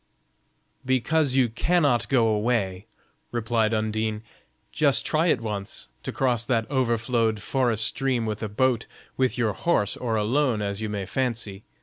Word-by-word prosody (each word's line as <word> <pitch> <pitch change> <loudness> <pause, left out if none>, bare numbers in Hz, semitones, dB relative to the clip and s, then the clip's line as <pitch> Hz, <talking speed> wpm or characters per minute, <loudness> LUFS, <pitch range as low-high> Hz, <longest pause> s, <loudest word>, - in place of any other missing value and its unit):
"Because 130 +2 +1
you 130 -2 +4
cannot 145 +1 +1
go 125 -4 +3
away," 105 -3 0 0.4
replied 115 -1 0
Undine. 110 0 -1 0.5
"Just 145 -3 +2
try 160 +2 +1
it 130 -8 +2
once, 105 - -4
to - - -5
cross 125 -4 +1
that 115 -2 0
overflowed 115 -3 +1
forest 115 -2 +2
stream 130 -3 0
with 110 -1 -3
a 110 - -3
boat, 120 +2 +1 0.3
with 130 -1 +1
your 115 -4 +1
horse, 105 - +1
or 115 -3 -2
alone, 120 +2 +1
as 100 0 -3
you 110 - -3
may 100 -2 -3
fancy. 110 -3 -3
115 Hz, 145 wpm, -25 LUFS, 110-130 Hz, 0.5 s, you